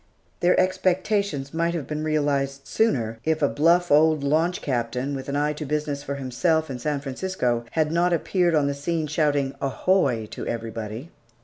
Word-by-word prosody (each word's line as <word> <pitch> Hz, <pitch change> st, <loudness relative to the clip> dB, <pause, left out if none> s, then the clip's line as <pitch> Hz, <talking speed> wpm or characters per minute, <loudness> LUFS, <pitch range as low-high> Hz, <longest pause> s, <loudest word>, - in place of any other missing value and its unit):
Their 175 Hz, +1 st, +3 dB
expectations 185 Hz, -5 st, 0 dB
might 170 Hz, +1 st, 0 dB
have 155 Hz, -5 st, -3 dB
been 150 Hz, 0 st, -4 dB
realized 140 Hz, -3 st, 0 dB
sooner, 115 Hz, -, 0 dB
if 160 Hz, -1 st, 0 dB
a -, -, +5 dB
bluff 170 Hz, +4 st, +3 dB
old 155 Hz, 0 st, +4 dB
launch 160 Hz, +5 st, +1 dB
captain, 125 Hz, +1 st, -2 dB
with 135 Hz, 0 st, -5 dB
an 140 Hz, -, -2 dB
eye 150 Hz, +1 st, +1 dB
to 150 Hz, -, -6 dB
business 150 Hz, -1 st, -2 dB
for 140 Hz, 0 st, -4 dB
himself 140 Hz, +4 st, 0 dB
and 125 Hz, -2 st, -6 dB
San 145 Hz, +1 st, -1 dB
Francisco, 130 Hz, -5 st, -2 dB
had 155 Hz, -1 st, +1 dB
not 175 Hz, +2 st, +2 dB
appeared 175 Hz, 0 st, +1 dB
on 150 Hz, -2 st, +3 dB
the 140 Hz, -, 0 dB
scene, 155 Hz, +3 st, -2 dB
shouting, 145 Hz, -3 st, 0 dB
"Ahoy" 135 Hz, -, +1 dB
to -, -, -6 dB
everybody. 115 Hz, +4 st, -5 dB
150 Hz, 175 wpm, -24 LUFS, 135-165 Hz, -, a